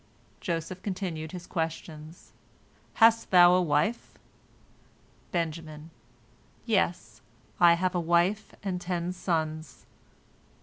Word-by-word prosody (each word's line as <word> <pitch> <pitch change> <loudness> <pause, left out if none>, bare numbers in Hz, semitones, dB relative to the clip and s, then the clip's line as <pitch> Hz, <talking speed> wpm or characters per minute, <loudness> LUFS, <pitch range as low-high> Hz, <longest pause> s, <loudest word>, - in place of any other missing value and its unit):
Joseph 170 +2 -4
continued 175 -6 -4
his 180 -1 -8
questions: 160 -1 -6 0.6
"Hast 230 0 +4
thou 175 -1 +7
a 185 - +4
wife?" 170 +8 -1 1.1
Benjamin: 160 -2 -4 0.7
"Yes, 175 - -1 0.4
I 175 -1 +7
have 185 +1 -1
a 180 - 0
wife 175 +5 +1
and 185 -3 -3
ten 175 -1 -3
sons." 155 -5 -3
175 Hz, 95 wpm, -28 LUFS, 160-185 Hz, 1.1 s, thou